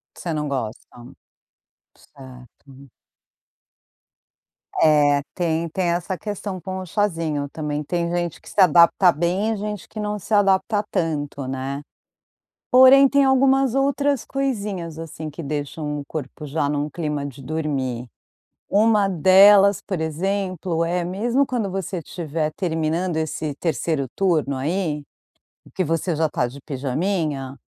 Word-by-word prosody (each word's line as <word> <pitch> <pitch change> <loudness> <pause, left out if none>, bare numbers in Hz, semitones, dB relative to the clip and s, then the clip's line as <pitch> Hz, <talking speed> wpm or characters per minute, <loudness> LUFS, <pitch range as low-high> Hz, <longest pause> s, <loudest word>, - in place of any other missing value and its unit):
Você 170 - -4
não 150 -1 -2
gosta. 120 -5 -4 1.1
Certo. 130 +1 -15 1.9
É, 145 -2 +4
tem 165 -1 -1
tem 175 +1 -1
essa 175 +2 -2
questão 205 -1 -5
com 185 +2 -5
o 185 - -7
cházinho, 165 -7 -1
também 150 -1 -3
tem 170 +2 -2
gente 175 -2 -2
que - - -15
se - - -14
adapta 175 +1 +6
bem 180 +7 0
e - - -2
gente 210 -1 -5
que 215 - -7
não 210 0 -2
se 205 - -9
adapta 205 +1 +3
tanto, 145 -6 -2
né. 135 +2 -4 0.9
Porém, 260 +2 +8
tem 280 +1 +3
algumas 265 -1 +3
outras 280 -1 +1
coisinhas, 205 - -3
assim, 160 -1 -7
que 160 +3 -8
deixam 150 +1 -4
o 140 - -8
corpo 150 0 -6
já 145 0 -1
num 145 0 -1
clima 150 -2 -3
de 135 0 -10
dormir. 135 -5 -3 0.6
Uma 210 -1 +3
delas, 195 +3 +6
por 190 -4 -4
exemplo, 175 +1 -1
é 175 +1 -1
mesmo 235 +10 0
quando 225 -6 -2
você 190 -1 -3
estiver 155 -2 -3
terminando 165 0 -1
esse 155 -2 -3
3º 155 -2 -1
turno 160 -8 +1
aí, 155 0 -1 0.7
que 185 - 0
você 165 +2 -1
já 160 +1 +1
tá 125 -4 -1
de 135 +3 -10
pijaminha, 140 0 -2
165 Hz, 135 wpm, -22 LUFS, 150-195 Hz, 1.9 s, Porém